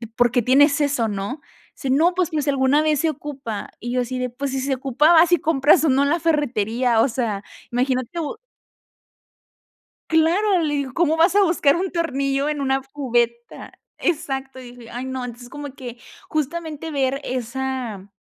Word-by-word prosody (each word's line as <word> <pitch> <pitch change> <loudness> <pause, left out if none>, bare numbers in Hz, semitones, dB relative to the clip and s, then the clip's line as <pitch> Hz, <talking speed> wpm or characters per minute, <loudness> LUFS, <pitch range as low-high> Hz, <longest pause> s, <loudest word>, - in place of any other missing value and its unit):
¿por 245 -2 +3
qué 245 -1 +2
tienes 280 +5 +4
eso, 275 -6 +1
no? 205 +9 -4 0.3
Sí, 270 - -5
no, 325 +7 +3
pues 365 -2 0
que 310 -3 -1
si 285 - -1
alguna 275 +2 +3
vez 305 -2 +1
se 325 - +2
ocupa 270 -7 -6
y 240 +1 -4
yo 250 0 +1
así 255 +1 -4
de, 250 0 -2
pues 270 +3 -4
si 265 - -2
se 270 0 0
ocupaba 275 +5 +3
vas 345 +1 +4
y - - +6
compras 300 +2 +3
o - - +3
no 270 +2 +3
en 280 - +1
la 340 - +1
ferretería. 245 -7 +1
O - - +4
sea, 220 -4 -2 0.3
imagina 255 +1 +1
tú. 335 +4 -4 1.7
Claro, 350 +4 +3
le 295 -2 0
digo: 275 -3 -2
"¿Cómo 325 -2 +2
vas 340 +4 +4
a 410 - +5
buscar 330 -5 +3
un 370 +1 -2
tornillo 275 -4 -1
en 295 -1 -2
una 270 0 +1
cubeta? 240 -4 -2 0.3
Exacto. 270 -6 -2
Y 245 -1 -10
dije: 235 -2 -13
"Ay, 245 +2 -5
no". 260 -1 -4
Entonces 245 0 -9
como 285 0 -8
que 245 -3 -9 0.3
justamente 315 +1 -3
ver 275 0 0
esa, 250 -4 -4
270 Hz, 190 wpm, -22 LUFS, 250-310 Hz, 1.7 s, y